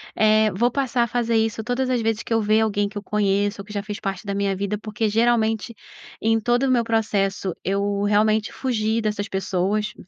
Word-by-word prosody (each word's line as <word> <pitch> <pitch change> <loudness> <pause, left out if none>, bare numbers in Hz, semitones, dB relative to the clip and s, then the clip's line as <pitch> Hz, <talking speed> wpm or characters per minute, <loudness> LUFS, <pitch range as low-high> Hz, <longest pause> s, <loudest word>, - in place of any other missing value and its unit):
Eh, 215 0 +4
vou 240 +6 +1
passar 255 -3 0
a - - -1
fazer 235 -1 0
isso 220 0 0
todas 255 +2 -1
as 245 -2 +1
vezes 225 -1 -1
que 230 - -3
eu 225 - +3
ver 215 +1 +3
alguém 205 -2 0
que 210 - -9
eu 205 - -5
conheço 205 -1 0
ou - - -12
que 210 - -10
já 200 0 -3
fez 210 -1 -6
parte 195 0 -4
da 200 - -2
minha 200 -1 0
vida, 200 +2 -2
porque 215 +1 -2
geralmente, 225 0 +1 0.5
em 225 0 +2
todo 240 +3 +1
o 265 - +2
meu 240 -2 +3
processo, 200 -5 0
eu 200 +1 0
realmente 215 +1 +2
fugi 225 -3 -1
dessas 210 -1 -2
pessoas. 195 +3 -1
215 Hz, 215 wpm, -23 LUFS, 205-225 Hz, 0.5 s, Eh